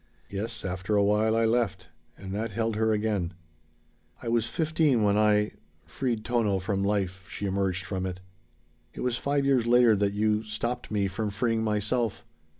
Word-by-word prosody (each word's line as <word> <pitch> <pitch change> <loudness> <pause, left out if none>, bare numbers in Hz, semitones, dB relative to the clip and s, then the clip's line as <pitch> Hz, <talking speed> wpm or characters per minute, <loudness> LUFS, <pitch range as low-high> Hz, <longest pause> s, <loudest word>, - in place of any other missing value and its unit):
"Yes, 110 +3 -4
after 95 +2 -2
a 100 - +4
while 105 +2 +3
I 115 0 +3
left." 105 -6 0 0.3
And 95 -1 -8
that 110 +3 -2
held 115 +1 -1
her 110 +1 +2
again. 105 -5 -1 0.8
"I 115 - -5
was 115 -1 +1
fifteen 155 -7 +2
when 100 -1 +3
I 105 0 +3 0.3
freed 120 -5 -2
Tono 115 -5 +1
from 100 +1 -1
life," 100 -1 -1
she 100 - -5
emerged 95 -1 -1
from 95 -2 -2
it. 90 0 -5 0.8
"It - - -6
was 125 -2 0
five 140 0 0
years 130 -4 +3
later 120 -2 +6
that 100 0 +1
you 105 +1 +1
stopped 120 +3 -4
me 100 -2 +1
from 105 +3 -3
freeing 115 +2 0
myself. 110 +2 -1
105 Hz, 170 wpm, -27 LUFS, 100-115 Hz, 0.8 s, later